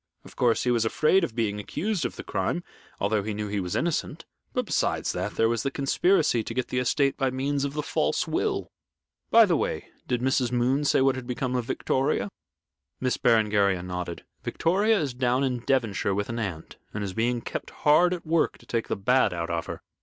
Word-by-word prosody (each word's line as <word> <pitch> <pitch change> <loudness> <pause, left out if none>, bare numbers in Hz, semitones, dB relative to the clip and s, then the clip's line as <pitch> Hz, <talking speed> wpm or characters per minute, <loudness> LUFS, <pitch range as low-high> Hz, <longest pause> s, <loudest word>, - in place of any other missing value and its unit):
Of - - -14
course, 120 -2 +2
he 125 - +2
was 115 -2 +2
afraid 155 +11 +3
of 120 -9 -3
being 105 -3 -1
accused 195 - -2
of - - -3
the - - -7
crime, 175 - -2 0.4
although 100 +1 +1
he 105 +1 -4
knew 105 0 -3
he 100 0 -1
was 90 -2 -3
innocent, 170 -2 -2 0.3
but, - - -1
besides - - 0
that, - - -3
there 115 - +3
was 115 -1 0
the 135 - -1
conspiracy 140 - +2
to 115 - -5
get 130 -1 -1
the 125 - 0
estate 140 +2 +1
by 135 -1 +1
means 140 +2 -1
of 140 - -3
the 150 - -1
false 75 - 0
will. - - -1 0.6
By - - +7
the - - +2
way, - - -2 0.2
did 125 - 0
Mrs. 130 -1 +1
Moon 125 +4 +1
say 140 - +3
what 135 0 +4
had 130 -2 -7
become 125 0 -2
of 125 -2 -1
Victoria?" 130 -5 0 0.7
Miss 130 -1 0
Berengaria 105 -6 +3
nodded. 90 -2 -5 0.2
"Victoria 200 +5 +2
is 145 -6 -2
down 125 +1 +1
in 125 -2 0
Devonshire 115 -7 +1
with 100 +2 -2
an 120 0 -3
aunt, 90 -8 -5 0.2
and 105 - -2
is 95 -2 -4
being 120 +3 0
kept - - -5
hard 155 +4 +4
at 180 -2 -4
work 160 0 +1
to - - -19
take 115 -1 -2
the - - -1
bad 125 -1 +2
out 85 0 -3
of 85 -1 -2
her. - - -7
125 Hz, 215 wpm, -26 LUFS, 105-140 Hz, 0.7 s, By